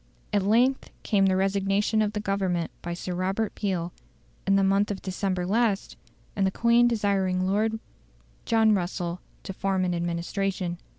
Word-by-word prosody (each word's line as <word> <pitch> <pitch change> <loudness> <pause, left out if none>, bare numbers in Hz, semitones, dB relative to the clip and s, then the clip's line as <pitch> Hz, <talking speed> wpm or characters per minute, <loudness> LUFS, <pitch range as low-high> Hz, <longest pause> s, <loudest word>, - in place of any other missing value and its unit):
At 205 - +3
length 240 +7 +2
came 195 -3 +3
the 190 - +2
resignation 195 +3 +1
of 210 -1 0
the 210 - -2
Government 190 -4 -1
by 175 0 -4
Sir 180 +1 -5
Robert 190 +4 -1
Peel, 180 -4 -2 0.5
in 195 - +4
the 195 - +3
month 195 +1 +2
of 200 -2 -4
December 185 -1 -2
last, 215 0 0 0.4
and 195 -1 +2
the - - +3
Queen 235 +4 +4
desiring 195 -5 +1
Lord 215 +3 +1 0.7
John 225 -2 +3
Russell 175 -2 -2 0.2
to 195 - -6
form 190 -1 0
an 180 - 0
administration. 175 +1 -2
195 Hz, 160 wpm, -26 LUFS, 185-210 Hz, 0.7 s, in